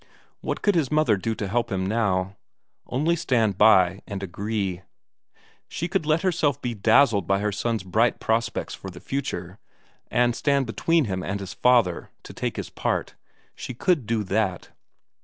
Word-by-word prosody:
What - - -4
could 205 - +4
his 160 -7 +1
mother 150 -8 +3
do 110 +4 -2
to 105 - -4
help 120 +5 -1
him 95 -1 -1
now? 95 -3 0 0.5
Only 155 +7 +1
stand 115 - +1
by 95 -5 +7
him 95 - -13
and 100 -1 -5
agree. 100 0 -3 0.9
She 170 - -3
could 160 -3 -1
let 155 +3 +2
herself 160 -7 +1
be 120 -1 -3
dazzled 110 -2 +3
by 100 - +3
her 105 +1 -1
son's 110 +1 -2
bright 110 +6 +1
prospects 115 +1 -1
for 95 - -8
the 90 -1 -11
future, 95 -9 -4 0.5
and 120 0 +2
stand 140 0 +1
between 160 +7 +1
him 95 -3 -3
and 100 +2 -3
his 95 -2 -7
father, 120 -8 +2
to - - -10
take - - -3
his - - -5
part - - -2 0.4
she 125 - -7
could 150 - +1
do 110 -2 0
that. 95 -2 -1
110 Hz, 175 wpm, -24 LUFS, 95-130 Hz, 0.9 s, by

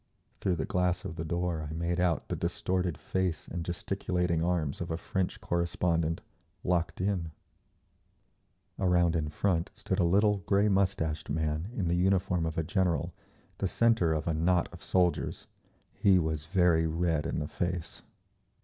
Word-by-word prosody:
Through 95 -2 +1
the 80 - -2
glass 90 0 0
of 80 - -5
the 80 - -4
door 85 -2 -2
I - - -5
made 85 +2 -1
out 90 -2 +1
the - - -2
distorted 90 -4 -1
face 95 -3 -2
and 85 0 -4
gesticulating 90 -1 -1
arms 85 -5 0
of 85 - -3
a 80 - -1
French 90 +1 -2
correspondent, 85 -1 0 0.4
locked 90 -2 0
in…. 90 -3 0 1.5
Around 90 -2 +3
in 75 -2 0
front 85 +1 0
stood - - -2
a - - +4
little, 100 +4 +4
grey 100 +1 +4
moustached 95 -6 0
man 80 +3 -1
in 95 -8 -1
the 85 - +1
uniform 90 -1 +2
of 80 - -4
a 80 - +1
general, 85 -1 0 0.5
the 95 - +1
centre 115 -5 +3
of 80 -1 -1
a 80 - +2
knot 85 +2 +2
of 85 - -11
soldiers. 90 -2 +1 0.5
He 95 -2 +4
was 80 -3 -1
very 85 -2 +3
red 80 -2 0
in - - -2
the 75 - -2
face. 90 0 -3
85 Hz, 160 wpm, -30 LUFS, 80-90 Hz, 1.5 s, a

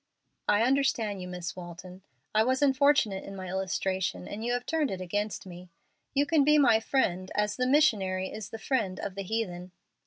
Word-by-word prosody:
"I 210 +2 +4
understand 235 -6 +1
you, 180 - -6
Miss 180 0 -5
Walton. 180 +1 -10 0.3
I 215 +1 +4
was 260 +4 +1
unfortunate 270 -7 +3
in 195 - -8
my 185 -1 -6
illustration, 190 - -2
and 215 +2 -6
you 240 - -1
have 245 0 -2
turned 315 -3 0
it 190 - -4
against 205 +4 -3
me. 180 -1 -11 0.5
You 285 +1 +3
can 305 -1 +3
be 300 +2 +5
my 245 -6 +5
friend, 185 -7 0
as 210 0 0
the 255 0 0
missionary 200 -10 +2
is 215 -1 -7
the 225 - -6
friend 215 -6 -1
of 200 - -4
the 200 - -5
heathen." 185 -3 -3
205 Hz, 190 wpm, -29 LUFS, 185-255 Hz, 0.5 s, be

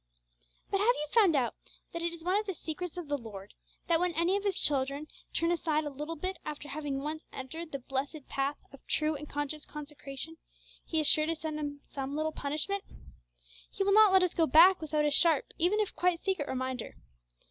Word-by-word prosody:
But 395 - +2
have 415 - +2
you 300 - -3
found 405 -9 +6
out 250 -4 +1 0.4
that 335 - -3
it 340 0 -1
is 335 -1 -9
one 365 +2 +1
of 425 0 -1
the 385 - -2
secrets 345 +2 -5
of 350 -4 -5
the 290 0 -1
Lord, 205 -4 -9 0.3
that 335 -1 +3
when 360 0 +1
any 340 +4 +2
of 405 - -1
His 400 -3 +1
dear - - +1
children 280 +1 +1 0.2
turn 335 +1 +1
aside 315 -3 +1
a 295 - -4
little 300 +4 -5
bit 370 +3 -4
after 295 -1 -6
having 290 -1 -3
once 310 +2 -5
entered 315 +5 -7
the 275 - -2
blessed 270 +3 -4
path 275 +2 -1 0.2
of 275 - -14
true 310 0 +1
and 300 +1 -7
conscious 290 +1 -3
consecration, 295 +1 -7 0.5
He 320 - -1
is 310 - +1
sure 305 +1 +5
to 330 - 0
send 310 -1 -4
them 285 -1 -4
some 275 0 -5
little 310 +1 0
punishment? 310 +8 -2 0.9
He 390 - -2
will 395 0 +3
not 430 -1 +8
let 380 -1 +6
us 360 - +1
go 325 -2 +3
back 345 +6 +7
without 305 -1 0
a 295 - +2
sharp, 315 0 +4
even 360 +6 +3
if 425 - -1
quite 355 -1 +2
secret, 375 -7 -1
reminder. 260 -2 -3
310 Hz, 215 wpm, -31 LUFS, 285-345 Hz, 0.9 s, not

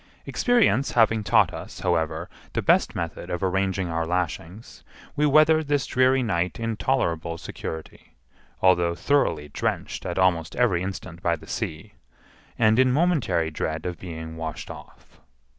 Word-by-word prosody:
Experience 235 - +2
having 115 -2 +3
taught 90 - +3
us, - - -8
however, 80 +2 0 0.3
the - - 0
best - - +3
method 85 +1 -5
of 90 +1 -3
arranging 95 0 0
our 80 -1 -2
lashings, 90 +3 -4 0.3
we 150 0 +2
weathered 155 +1 +4
this 145 -3 +1
dreary 130 +1 +3
night 90 -4 -1
in 115 -1 -2
tolerable 85 -8 -1
security, 80 -1 -8 0.5
although 90 -2 +4
thoroughly 110 - +1
drenched - - -3
at 85 - -4
almost 90 -3 +1
every 110 -9 +2
instant 90 -2 -6
by 85 -1 +1
the 75 - -14
sea, 100 +7 -5 0.6
and 110 +1 +4
in 130 -1 +5
momentary 135 - +1
dread 80 +1 -3
of 90 -3 -4
being 80 -2 -7
washed 80 -1 -5
off. - - -14
90 Hz, 145 wpm, -25 LUFS, 85-125 Hz, 0.6 s, in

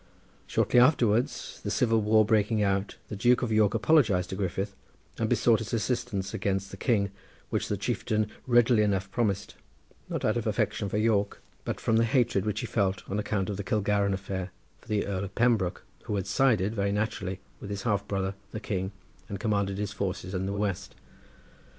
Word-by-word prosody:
Shortly 125 - +3
afterwards 120 -4 +2
the - - -2
civil 115 -2 +2
war 110 +1 +4
breaking 105 -1 +2
out 100 0 0
the - - -4
Duke 120 +5 +3
of 120 - -1
York 110 -1 +3
apologised 110 - +3
to - - -2
Griffith 95 +1 -2 0.5
and - - 0
besought - - +4
his - - -3
assistance 95 +1 -2
against 100 -2 -1
the - - -6
king, 100 -4 +1 0.4
which - - 0
the - - -1
chieftain 110 0 0 0.2
readily 120 -2 +5
enough 100 -2 0
promised, 100 -4 -1 0.6
not - - -2
out - - +2
of - - -2
affection 100 - 0
for 105 - -1
York 105 -2 +1 0.3
but - - -3
from 110 - +2
the 115 - +4
hatred 115 -5 +2
which 105 0 -1
he - - -3
felt, 95 -3 -1
on 100 - -2
account 105 -2 -1
of 100 -2 -3
the 100 - -3
Kilgarran 100 0 +1
affair, 95 -1 -4 0.3
for - - -23
the 105 -2 0
Earl 100 -1 -2
of 100 - -10
Pembroke, 115 -7 +2 0.2
who 105 - -2
had 95 - -1
sided, 105 -1 +2
very 100 -2 0
naturally, 100 -3 -2 0.2
with 100 - -8
his 100 -1 -4
half 105 -4 0
brother 95 -1 -1 0.2
the 110 - -5
king 95 -2 -3 0.4
and 100 -2 -4
commanded 100 -3 0
his 105 0 -2
forces 95 -2 -3
in 95 0 -1
the 100 - -2
west. 100 -2 -2
100 Hz, 190 wpm, -28 LUFS, 95-110 Hz, 0.6 s, readily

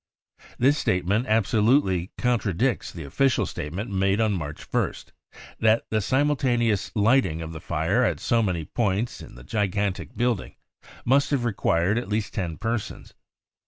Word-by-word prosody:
This 140 +5 +3
statement 100 +7 0
absolutely 110 - +2
contradicts 120 -1 0
the 85 - -8
official 125 - +1
state 75 - -5
ment 100 +6 -5
made 95 +1 +1
on 110 -2 +2
March 75 -5 -5
1st, - - -2 0.5
that 110 +1 +3
the 110 -1 +1
simultaneous 125 -4 +1
lighting 105 -6 +3
of 80 0 -6
the 80 - -8
fire 85 +8 0
at - - 0
so 115 -1 +2
many 90 -7 -1
points 110 +4 -1
in - - -12
the - - -12
gigantic 100 - -2
building 120 -4 -1 0.5
must 135 +3 +3
have 135 -4 0
required 100 -2 +1
at 120 - -7
least 105 0 -2
ten 85 -5 -3
persons. 115 0 -4
105 Hz, 150 wpm, -25 LUFS, 90-120 Hz, 0.5 s, This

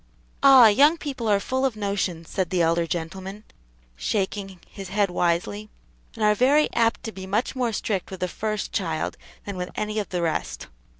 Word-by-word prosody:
"Ah! 270 -3 +9
young 285 +10 +5
people 270 -7 -5
are 205 -2 +3
full 260 +6 -2
of 265 -4 +1
notions," 200 -5 -2
said 185 -4 -2
the 180 -2 +1
elder 165 +1 +1
gentleman, 190 +5 -5 0.5
shaking 195 - -3
his 195 -2 -9
head 200 -1 +1
wisely, 180 +5 -1 0.5
"and 225 - -3
are 210 0 +5
very 275 +7 +3
apt 230 -1 +1
to 225 - -5
be 190 -2 -9
much 215 +7 -1
more 250 -3 0
strict 205 -3 -2
with 190 - -8
the 180 - +1
first 215 +3 -3
child 165 -5 -2 0.3
than 200 -2 -5
with 180 0 -4
any 215 0 -2
of 205 - -4
the 175 -2 -2
rest. 160 -2 -2
200 Hz, 185 wpm, -24 LUFS, 180-225 Hz, 0.5 s, Ah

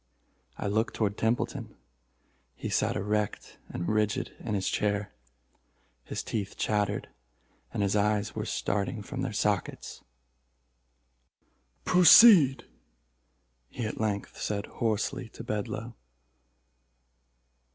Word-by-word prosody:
I - - -5
looked 110 +3 0
toward 105 -2 0
Templeton. 115 +3 -2 0.8
He - - -5
sat - - +1
erect 105 +1 -2
and 85 - -4
rigid 105 -1 0
in 105 -3 -3
his 95 -1 -1
chair—his 65 - -5
teeth 100 -3 -4
chattered, 105 -1 -1 0.6
and 105 - -1
his 100 +1 +1
eyes 105 0 +1
were - - -4
starting 105 +2 -2
from 135 +3 -5
their 125 - -2
sockets. 105 -3 -2 1.8
"Proceed!" 180 - +7 1.0
he 120 - -5
at 110 - -4
length 105 -2 -3
said 100 -1 -2
hoarsely 115 +3 -2
to 115 - -10
Bedloe. 110 +1 -4
105 Hz, 100 wpm, -28 LUFS, 100-115 Hz, 1.8 s, Proceed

